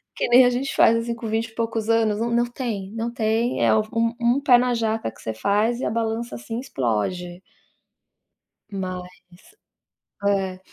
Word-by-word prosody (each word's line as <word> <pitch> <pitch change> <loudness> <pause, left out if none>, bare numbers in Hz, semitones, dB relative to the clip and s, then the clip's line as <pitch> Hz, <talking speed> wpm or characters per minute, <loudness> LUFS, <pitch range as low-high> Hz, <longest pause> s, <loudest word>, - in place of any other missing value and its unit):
Que - - -1
nem 250 +1 +7
a 245 - +4
gente 255 +3 -2
faz 230 - +5
assim 230 0 -2
com 230 -1 -6
vinte 225 +1 0
e 225 - -18
poucos 225 -1 -2
anos, 225 -2 +2
não 235 - 0
não 235 +1 +2
tem 220 -6 -5
não 230 +1 -2
tem 230 +1 0
é - - +4
um 215 - +3 0.4
um 240 +4 +2
pé 250 -3 +6
na 250 0 +1
jaca 225 - -1
que 115 - -17
você 110 - -3
faz 210 - 0
e - - -2
a - - 0
balança, 230 +1 -2
assim, 120 - -6
explode. 175 - -2 1.3
Mas, 185 -2 -5 1.2
é. 190 -2 0
225 Hz, 180 wpm, -23 LUFS, 195-235 Hz, 1.3 s, nem